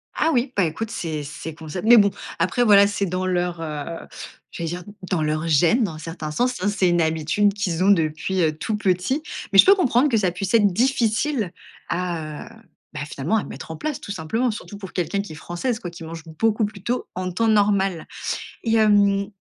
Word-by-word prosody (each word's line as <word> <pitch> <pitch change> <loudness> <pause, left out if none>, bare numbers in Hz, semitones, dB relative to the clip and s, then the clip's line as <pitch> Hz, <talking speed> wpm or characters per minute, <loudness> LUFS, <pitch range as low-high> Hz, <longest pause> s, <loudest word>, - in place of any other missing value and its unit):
Ah 320 - +2
oui, 250 +1 +1
bah 200 - +3
écoute, 180 +7 -2
c'est 155 -3 -4
c'est 155 +2 -7
concept, 160 +5 -6
mais 240 +1 +9
bon, 200 -2 +5 0.3
après 245 - +2
voilà, 200 -3 +7
c'est 200 -1 -1
dans 185 +1 -2
leur, 180 -2 -1
heu, 155 +1 -5 0.4
j'allais 170 - -4
dire 175 +2 -5 0.3
dans 180 -4 0
leurs 155 +1 -1
gênes, 170 - +4
dans 190 -7 -2
un - - -9
certains 165 -1 -6
sens. 250 +9 0
Hein, 195 - 0
c'est 195 -3 +2
une 175 0 +2
habitude 160 +6 +1
qu'ils 185 -4 -1
ont 200 - +5
depuis, 165 +1 +1
heu, 155 -2 +1
tout 215 +7 -2
petit, 195 - 0 0.3
mais 195 - +6
je - - +10
peux 390 - +7
comprendre 280 -6 +3
que 235 - +2
ça 190 -4 +1
puisse 190 +3 -4
être 215 -3 +6
difficile 235 - +1 0.4
à, 170 -4 -3
heu, - - -11 0.4
bah, - - -5
finalement 150 +7 -1
à 215 - -1
mettre - - -8
en 160 - -6
place, 305 - -4
tout - - -7
simplement, 210 +8 -1
surtout 210 -1 -8
pour 195 -2 -9
quelqu'un 195 +2 -1
qui 200 -5 -9
est - - -9
française, 175 - -3
quoi, 175 -7 -6
qui 170 -1 -10
mange 165 0 -8 0.2
beaucoup 220 -1 +2
plus 205 -2 -8
tôt 245 +3 -2
en 185 0 -3
temps 225 +6 0
normal. 200 -5 +2 0.6
Et 225 -1 +1
hem, 205 -2 +4
190 Hz, 215 wpm, -23 LUFS, 165-220 Hz, 0.6 s, je